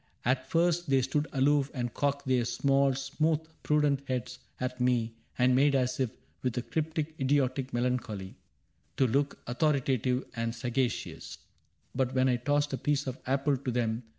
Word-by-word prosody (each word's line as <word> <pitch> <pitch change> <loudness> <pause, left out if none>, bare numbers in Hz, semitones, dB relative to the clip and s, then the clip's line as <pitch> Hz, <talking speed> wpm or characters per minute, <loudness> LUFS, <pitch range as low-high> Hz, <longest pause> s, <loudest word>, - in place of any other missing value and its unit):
" - - -28
At 130 +1 +1
first 170 -1 +2
they 135 -1 +4
stood 145 +4 0
aloof 140 0 +3
and 120 -2 -2
cocked 140 0 -1
their 130 -2 +3
small, 135 +3 +2
Smooth, 150 +4 0 0.2
prudent 150 -2 +2
heads 125 0 -3 0.2
at 125 0 -3
me 120 -2 +2 0.2
and 125 0 +4
made 140 +2 +4
as 130 -1 +1
if. 130 -3 +1 0.3
With 125 -1 -2
a 125 - 0
cryptic 160 +1 -2
idiotic 135 -1 +1
melancholy, 120 -6 -2 0.6
To 135 - +4
look 140 +4 +1
authoritative 130 -2 +1
and 115 0 -2
sagacious; 125 +1 -2 0.6
But 130 -1 0
when 130 0 +4
I 125 - +2
tossed 145 +3 0
a 135 - -2
piece 145 -1 0
of 130 -1 -4
apple 135 +1 +2
to 130 0 -4
them. 115 -1 0
130 Hz, 165 wpm, -30 LUFS, 125-145 Hz, 0.6 s, they